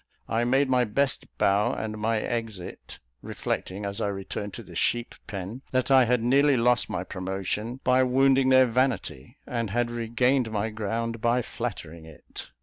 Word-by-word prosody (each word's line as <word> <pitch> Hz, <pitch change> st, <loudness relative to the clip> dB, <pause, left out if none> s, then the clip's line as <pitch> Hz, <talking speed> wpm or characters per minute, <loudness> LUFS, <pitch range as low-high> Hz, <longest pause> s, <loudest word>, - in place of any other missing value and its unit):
I 115 Hz, +1 st, 0 dB
made 135 Hz, +3 st, +3 dB
my 125 Hz, -1 st, +3 dB
best 130 Hz, +5 st, 0 dB
bow 100 Hz, +1 st, +2 dB
and 110 Hz, -1 st, -4 dB
my 110 Hz, +1 st, +1 dB
exit, 110 Hz, -5 st, -5 dB, 0.2 s
reflecting, 100 Hz, +3 st, -4 dB
as 100 Hz, 0 st, -4 dB
I -, -, +1 dB
returned 100 Hz, +1 st, -5 dB
to -, -, -8 dB
the -, -, -13 dB
"sheep 120 Hz, 0 st, 0 dB
pen," 100 Hz, +5 st, -6 dB
that 130 Hz, +1 st, 0 dB
I 130 Hz, -2 st, +7 dB
had 120 Hz, -1 st, +1 dB
nearly 140 Hz, +3 st, +4 dB
lost 120 Hz, +1 st, +2 dB
my -, -, -2 dB
promotion 95 Hz, +6 st, -4 dB
by 130 Hz, +1 st, +4 dB
wounding 130 Hz, +1 st, +4 dB
their 130 Hz, 0 st, +7 dB
vanity, 125 Hz, -, -1 dB
and 115 Hz, -3 st, -2 dB
had 120 Hz, +3 st, 0 dB
regained 120 Hz, +2 st, +1 dB
my 110 Hz, 0 st, -2 dB
ground 115 Hz, +2 st, -3 dB
by 120 Hz, +2 st, +2 dB
flattering 85 Hz, -10 st, -6 dB
it. 80 Hz, -2 st, -11 dB
115 Hz, 165 wpm, -26 LUFS, 105-125 Hz, 0.2 s, I